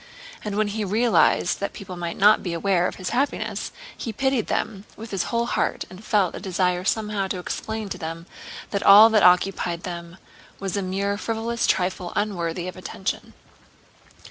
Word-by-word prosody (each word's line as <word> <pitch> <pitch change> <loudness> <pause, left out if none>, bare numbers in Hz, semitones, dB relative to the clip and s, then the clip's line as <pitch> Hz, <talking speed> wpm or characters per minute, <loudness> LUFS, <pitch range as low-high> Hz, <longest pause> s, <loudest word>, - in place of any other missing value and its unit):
And 210 -2 -3
when 215 -1 +1
he 215 +1 -2
realized 220 +4 +3
that 200 - -3
people 190 -2 -8
might 170 -1 -4
not 210 +2 +6
be 175 - -3
aware 180 +1 +2
of - - -5
his 185 -2 -4
happiness, 270 +4 -1 0.2
he 230 - -5
pitied 265 0 0
them 205 -3 -2
with 225 +1 -9
his 195 -3 -1
whole 235 0 0
heart - - -1
and 185 +3 -11
felt 200 -5 +2
a - - -6
desire 180 -1 0
somehow 210 -1 0
to 190 - -3
explain 220 +4 -4
to - - -5
them 165 +1 -6 0.5
that 200 - -1
all 210 +3 +9
that 215 -2 +4
occupied 180 -1 +3
them 170 -1 -7 0.4
was 195 -1 -3
a 200 - 0
mere 200 +2 -1
frivolous 230 +1 -1
trifle 180 -1 0
unworthy 175 -4 -2
of 185 - -6
attention. 190 +1 -5
195 Hz, 175 wpm, -24 LUFS, 180-215 Hz, 0.5 s, all